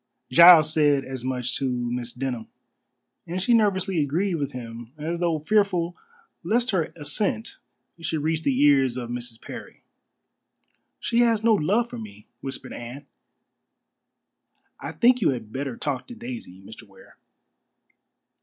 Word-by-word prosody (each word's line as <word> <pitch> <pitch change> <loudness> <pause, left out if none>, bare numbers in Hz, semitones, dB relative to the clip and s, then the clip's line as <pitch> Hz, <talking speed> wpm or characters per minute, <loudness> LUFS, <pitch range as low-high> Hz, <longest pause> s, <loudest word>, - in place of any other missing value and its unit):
Giles 160 +1 +8
said 145 -3 +3
as 130 -2 -6
much 125 -1 -2
to 135 - -1
Miss 120 -1 -3
Denham, 125 -3 -4 0.8
and 175 +2 -3
she 240 +6 +2
nervously 195 -5 +2
agreed 170 +7 0
with 145 -4 -2
him 115 -1 -8
as 165 +3 -3
though 170 -2 +1
fearful 180 0 +1 0.5
lest 240 +2 +1
her 180 -5 +1
assent 200 +9 -2 0.4
should 160 -2 -2
reach 160 0 0
the 135 -4 0
ears 135 -4 +4
of 120 -1 -5
Mrs. 120 -1 -6
Parry. - - -10 1.2
"She 235 - 0
has 230 -2 +3
no 230 -1 +5
love 210 +6 +2
for 240 0 -8
me," 215 -2 -11
whispered 135 -1 -7
Anne. 125 +4 -8 1.7
"I - - -6
think 250 +1 +3
you - - +4
had 115 -5 -4
better 135 -2 -4
talk 140 -4 -3
to 245 - -9
Daisy, 235 - -8
Mr. 110 +2 -12
Ware." 100 - -19
150 Hz, 145 wpm, -25 LUFS, 125-200 Hz, 1.7 s, Giles